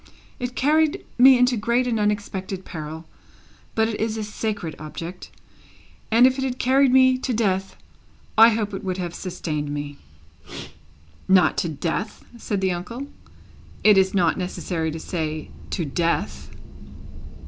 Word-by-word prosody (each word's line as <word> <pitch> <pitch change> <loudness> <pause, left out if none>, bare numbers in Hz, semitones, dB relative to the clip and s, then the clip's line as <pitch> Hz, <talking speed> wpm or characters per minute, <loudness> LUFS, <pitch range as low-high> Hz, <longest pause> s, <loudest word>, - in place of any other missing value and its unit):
It 250 0 -4
carried 310 +2 +2
me 260 +1 +8
into 250 0 +3
great 235 +3 +1
and 235 -3 0
unexpected 200 -2 -2
peril; 160 0 -7 0.7
but 220 0 +3
it 220 -2 -4
is 220 0 -1
a 215 - -3
sacred 205 -6 -4
object, 165 +4 -8 0.8
and 230 +3 +6
if 260 +1 +3
it - - -1
had 255 -1 -2
carried 265 +1 +3
me 260 0 +5
to 260 - -2
death 195 -3 -1 0.6
I 225 +1 +8
hope 215 -2 -2
it 195 - -5
would 185 -1 -2
have 175 -2 -4
sustained 160 -5 -4
me." 145 0 -5 1.3
"Not 190 -1 +5
to 170 - -1
death," 165 +7 -4
said 205 -4 -3
the 190 -1 +1
uncle; 230 +10 -5 0.8
"it 210 -1 +7
is 190 0 +3
not 175 -1 +2
necessary 180 -2 -3
to 160 +1 -5
say, 155 -2 -4 0.2
to 170 - -2
death." 105 - -2
195 Hz, 150 wpm, -23 LUFS, 170-235 Hz, 1.3 s, me